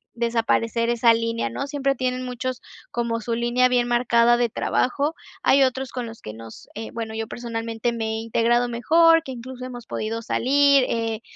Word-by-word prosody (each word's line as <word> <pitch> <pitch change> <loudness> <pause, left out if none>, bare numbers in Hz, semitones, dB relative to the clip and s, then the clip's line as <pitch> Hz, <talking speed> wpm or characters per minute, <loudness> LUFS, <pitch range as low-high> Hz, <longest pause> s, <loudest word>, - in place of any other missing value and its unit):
desaparecer 230 0 0
esa 235 0 +4
línea, 230 0 -2
¿no? 275 - -4
Siempre 275 -1 0
tienen 255 0 -2
muchos, 250 0 -4 0.3
como 235 -1 -1
su 230 +1 -3
línea 240 +2 +2
bien 245 -1 +1
marcada 240 0 +3
de 240 -1 +2
trabajo. 285 +8 0 0.3
Hay 275 0 +5
otros 265 0 -1
con 250 -2 -4
los 225 0 -10
que 110 - -8
nos 115 0 -12
eh, 220 +1 -6
bueno, 225 -1 -5
yo 225 0 -3
personalmente, 230 0 -3
me 225 -1 -3
he 220 0 -2
integrado 235 +2 +1
mejor, 330 +7 +4
que 265 - -7
incluso 255 +1 -8
hemos 245 -2 -9
podido 225 +1 -3
salir. 280 +3 +3
Eh, 225 -1 -2
240 Hz, 180 wpm, -23 LUFS, 230-255 Hz, 0.3 s, Hay